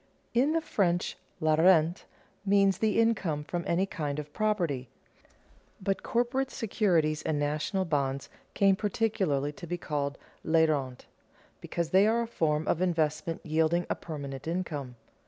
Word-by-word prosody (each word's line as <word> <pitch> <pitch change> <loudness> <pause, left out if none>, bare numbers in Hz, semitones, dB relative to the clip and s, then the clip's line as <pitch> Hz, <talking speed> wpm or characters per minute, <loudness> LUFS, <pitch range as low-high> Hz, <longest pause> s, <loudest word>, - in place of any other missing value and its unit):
In 265 +6 +3
the 330 - +1
French 175 - 0 0.2
la 155 0 +2
rente 165 +1 +4 0.4
means 195 -1 +3
the 220 0 +2
income 190 -10 +1
from 175 +3 -3
any 175 +3 +2
kind 150 -6 -4
of 150 0 -6
property; 170 - -1 0.9
but 195 0 -1
corporate 250 +3 0
securities 175 - +1
and 155 -2 -1
national 150 +6 -1
bonds 140 -4 -1 0.3
came 195 -1 +4
particularly 195 -9 0
to 170 +3 -10
be 175 +2 -2
called 140 -4 -3 0.3
les 160 0 +4
rentes, 135 -5 -2 0.5
because 170 -2 -3
they 195 +3 +5
are 230 +2 +2
a - - -5
form 155 -7 0
of 170 - +1
investment 160 -2 -1
yielding 160 +2 +1
a - - +1
permanent 140 -3 -7
income. 155 -7 -3
170 Hz, 145 wpm, -29 LUFS, 150-195 Hz, 0.9 s, they